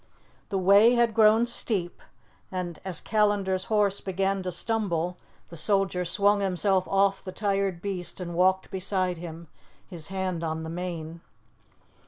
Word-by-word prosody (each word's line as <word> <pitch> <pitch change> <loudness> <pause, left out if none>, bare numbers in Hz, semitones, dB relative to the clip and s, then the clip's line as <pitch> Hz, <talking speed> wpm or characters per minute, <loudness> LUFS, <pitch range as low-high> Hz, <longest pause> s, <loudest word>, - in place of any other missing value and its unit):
The 195 - -1
way 200 +6 +6
had 235 -2 +2
grown 220 +1 +5
steep, 205 -7 -3 0.5
and 180 -3 -4
as 185 -4 -2
Callandar's 205 -3 +1
horse 205 -2 +1
began 195 +1 -1
to 185 0 -3
stumble, 180 -4 -1 0.3
the 170 - -10
soldier 195 0 +1
swung 200 +4 +2
himself 190 0 +1
off 195 0 +2
the 185 - -6
tired 195 -3 -1
beast 190 -3 -2
and 175 -1 -5
walked 185 +2 +2
beside 185 -2 -1
him, 165 -1 -8 0.4
his 170 -5 -5
hand 190 -3 -3
on 160 0 -3
the 160 - -6
mane. 170 -2 -5
190 Hz, 145 wpm, -27 LUFS, 175-200 Hz, 0.5 s, way